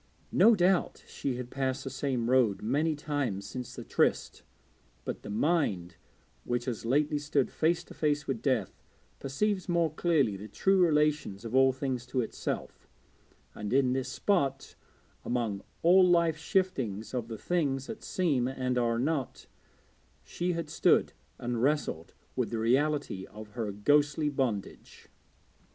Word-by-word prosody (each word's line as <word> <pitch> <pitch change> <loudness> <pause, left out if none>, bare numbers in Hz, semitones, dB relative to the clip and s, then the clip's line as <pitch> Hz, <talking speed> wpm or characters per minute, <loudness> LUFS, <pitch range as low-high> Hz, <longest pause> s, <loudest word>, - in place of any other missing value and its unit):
No 230 0 +6
doubt 185 -1 +1
she 135 -3 -3
had 125 0 -6
passed 135 0 -2
the 135 - -5
same 125 -3 -1
road 120 -5 +3
many 150 +8 +1
times 145 -10 -2
since 125 +3 -7
the - - -7
tryst, - - 0 0.6
but - - -4
the - - -9
mind 105 - 0 0.5
which 120 0 -2
has 120 -3 -4
lately 145 +3 +2
stood 145 -2 0
face 165 +2 +1
to - - -13
face 150 -1 0
with 125 -5 -3
death 125 -7 -1 0.4
perceives 185 +8 -1
more 170 -3 +1
clearly 155 - +2
the 105 +3 -8
true 190 - +2
relations 150 - +1
of 115 - -6
all 130 0 +5
things 130 -2 -3
to 130 - 0
itself; 115 - -5 0.7
and, 105 -1 -5
in 130 -2 +3
this 130 0 -2
spot, 135 -5 0 0.5
among 115 -5 -2 0.2
all 180 +3 +7
life's 170 -3 +3
shiftings 130 - -1
of 120 -3 -2
the 115 -1 -6
things 135 -1 -1
that 225 - -7
seem 145 -10 0
and 130 -1 -1
are 115 -1 +1
not, 140 +1 -2 0.8
she 175 +1 -2
had 165 -2 -3
stood - - +3 0.2
and 120 -1 -3
wrestled 135 - -1 0.2
with - - -1
the 115 - -3
reality 130 -3 0
of 105 0 -11
her 110 -2 -3
ghostly 145 +8 +2
bondage. 125 -8 -4
135 Hz, 150 wpm, -30 LUFS, 120-155 Hz, 0.8 s, all